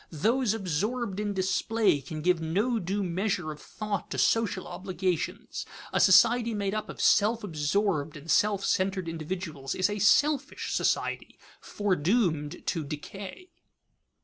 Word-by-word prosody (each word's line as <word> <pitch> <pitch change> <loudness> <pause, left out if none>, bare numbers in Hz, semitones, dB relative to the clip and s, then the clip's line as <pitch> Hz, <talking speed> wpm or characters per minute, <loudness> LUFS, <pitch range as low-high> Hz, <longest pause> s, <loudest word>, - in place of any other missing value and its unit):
Those 225 - +1
absorbed 205 +3 -2
in 205 -1 -2
display 190 -2 +1
can 155 +3 -7
give 180 -1 +2
no 205 +9 0
due 195 +2 -2
measure 180 -2 -1
of 150 - -10
thought 210 -2 -4
to - - -4
social 225 -4 +1
obligations. 185 -3 -3 0.3
A - - +2
society 230 +4 +5
made 200 -1 -1
up 215 0 -3
of - - -8
self 220 +2 +3
absorbed 155 -2 -1
and 145 - -12
self 205 -2 +2
centered 185 -1 0
individuals 160 -4 -4
is 185 +2 +1
a 205 - -3
selfish 285 +7 +2
society, - - -1 0.2
foredoomed 180 -4 0
to 165 - -1
decay. 195 - -8
195 Hz, 135 wpm, -28 LUFS, 165-215 Hz, 0.3 s, society